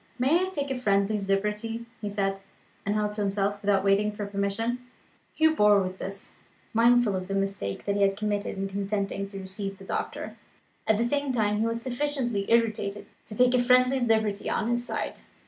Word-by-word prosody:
"May 315 +9 +3
I - - -4
take 285 -6 -3
a 260 - -2
friendly 200 -2 +2
liberty?" 210 +4 -1 0.2
he 210 - -3
said 195 -1 -1 0.5
and 205 - +1
helped 210 0 -1
himself, 200 0 0
without 200 -2 +2
waiting 200 +1 +3
for 205 0 -5
permission. 200 +4 -1 0.6
Hugh 315 0 +4
bore 210 -3 +6
with 185 0 -3
this, 195 +1 -7 0.4
mindful 235 -2 +4
of 185 0 -4
the 195 - -2
mistake 195 - -2
that 200 - 0
he 205 - 0
had 195 0 +3
committed 205 -1 -2
in 195 0 -2
consenting 195 0 -2
to 200 - -8
receive 195 +1 -5
the 195 - -12
doctor. - - -4 0.5
At 220 -1 +4
the 230 - +1
same 285 +2 0
time, 210 -4 +1
he 225 - +2
was 230 0 -3
sufficiently 250 -5 -1
irritated 215 -3 +1 0.2
to 210 - -8
take 250 +2 +4
a 250 - +4
friendly 255 +2 +4
liberty 220 -4 +1
on 225 +1 0
his 240 0 0
side. - - -4
210 Hz, 190 wpm, -27 LUFS, 200-240 Hz, 0.6 s, bore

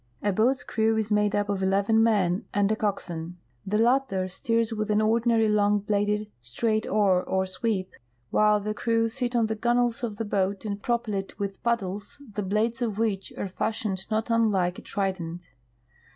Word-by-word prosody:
A 205 - +2
boat's 245 +7 +2
crew 220 0 +1
is 220 -1 -1
made 210 -1 +2
up 205 0 +1
of 200 -1 -1
eleven 200 +3 +3
men 200 -5 +2
and 205 0 +3
a - - +2
coxswain. 175 -5 -3 0.3
The 210 +2 +1
latter 235 -5 +2
steers 230 +2 0
with 215 0 -2
an 210 0 +3
ordinary 225 +1 +3
long 210 -1 +3
bladed, 210 +1 0
straight 215 - -1
oar 195 -3 +3
or 190 +1 0
sweep, 190 -1 -2 0.4
while 210 0 +4
the 210 +1 -3
crew 230 +1 +1
sit 245 +1 -2
on 230 -2 +3
the 220 0 -2
gunwales 240 +1 +1
of 220 -3 -2
the 225 - -2
boat 200 0 -1
and 200 -1 -3
propel 235 -2 -1
it 195 0 -4
with 200 -1 -4
paddles, 205 -2 -2
the 210 - -2
blades 215 +5 0
of 220 -4 -1
which 215 -4 -1
are 200 - -3
fashioned 200 0 -3
not 220 +1 -1
unlike 200 -6 +2
a - - -10
trident. 175 -5 -4
210 Hz, 180 wpm, -26 LUFS, 195-225 Hz, 0.4 s, while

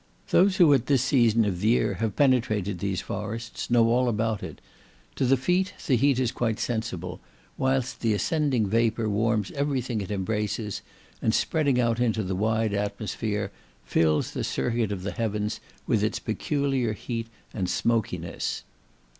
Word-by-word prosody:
Those 190 +1 +4
who 165 -6 +7
at 130 -3 +2
this 135 -4 +3
season 115 -4 +3
of 95 -4 -1
the 105 - 0
year 110 -3 +3
have 110 -3 -1
penetrated 110 -9 +2
these 95 -1 -1
forests, 115 +2 -5
know 120 -1 +5
all 125 +2 +3
about 110 -1 -1
it. - - -7 0.6
To - - +2
the 135 +1 +4
feet 180 +8 0
the 130 - +3
heat 135 +2 +3
is 125 -2 +1
quite 115 -4 -1
sensible, 100 -7 -3 0.4
whilst 130 -1 0
the 110 -3 +1
ascending 135 - +1
vapour 115 +2 +1
warms 105 0 +1
every 140 -1 0
thing 120 -3 -3
it 95 - -6
embraces, 105 +1 -2 0.4
and 110 - +2
spreading 145 -6 +1
out 115 -1 +1
into 110 -3 +1
the 95 - -2
wide 110 +2 +1
atmosphere, 105 0 -2 0.3
fills 80 +4 +2
the - - -3
circuit 115 - -1
of 95 -3 -4
the 100 - -2
heavens 105 -2 -2 0.3
with - - +1
its - - 0
peculiar 135 -6 -1
heat 115 +1 -4 0.3
and 95 -3 -2
smokiness." 115 0 -1
115 Hz, 165 wpm, -26 LUFS, 105-125 Hz, 0.6 s, who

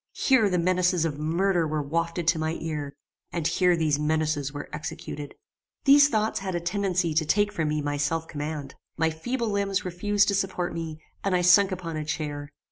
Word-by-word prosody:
Here 255 -7 +3
the 180 - +1
menaces 180 -1 +2
of 150 -3 -3
murder 170 +2 +1
were 155 -1 -1
wafted 165 +3 -2
to 170 -2 +2
my 160 0 -1
ear; 150 -3 -4 0.4
and 170 -3 -3
here 180 +1 +3
these 155 -3 +1
menaces 150 -2 0
were 145 - -6
executed. 150 -1 -6 0.5
These 285 +1 +7
thoughts 220 -2 0
had 190 -2 -4
a - - 0
tendency 180 -2 0
to 160 +1 +2
take 205 +6 +2
from 160 -5 -1
me 150 -1 -1
my 145 0 -1
self 160 +3 -1
command. 145 -2 -5 0.2
My 160 0 +2
feeble 235 +9 -3
limbs 200 -2 -1
refused 200 +3 +1
to - - +1
support 190 -3 -1
me, 160 -2 -6 0.2
and 195 -2 +1
I 180 - +2
sunk 190 +3 +6
upon 170 -3 -4
a 155 - -2
chair. 150 -1 -4
165 Hz, 195 wpm, -26 LUFS, 155-190 Hz, 0.5 s, These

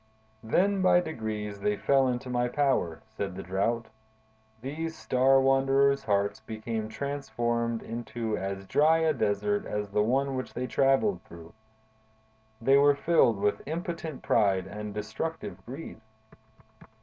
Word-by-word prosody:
"Then, 190 - +2
by 185 -1 +5
degrees, 110 - -4
they 105 +1 0
fell 135 -1 +3
into 125 0 -2
my 125 -1 0
power," 125 - 0
said 100 -4 -5
the 95 - -6
Drought. 105 +6 -1 0.7
"These 160 +6 -5
star 130 +1 +3
wanderers' 135 +1 +3
hearts 100 0 0
became 110 0 -5
transformed 120 -3 -2
into 115 -1 -4
as 95 0 -4
dry 155 +10 +4
a 160 -1 +2
desert 105 -4 0
as 105 -1 -3
the 105 - +2
one 135 +5 +1
which 130 - -5
they 125 - -2
traveled 135 - +2
through. 85 +1 -13 1.1
They 135 +4 +4
were 145 0 +5
filled 140 -8 +3
with 105 +1 0
impotent 165 -2 -5
pride 95 -4 +2
and 105 +2 -6
destructive 110 +11 -5
greed. 135 -3 -8
120 Hz, 135 wpm, -28 LUFS, 105-140 Hz, 1.1 s, by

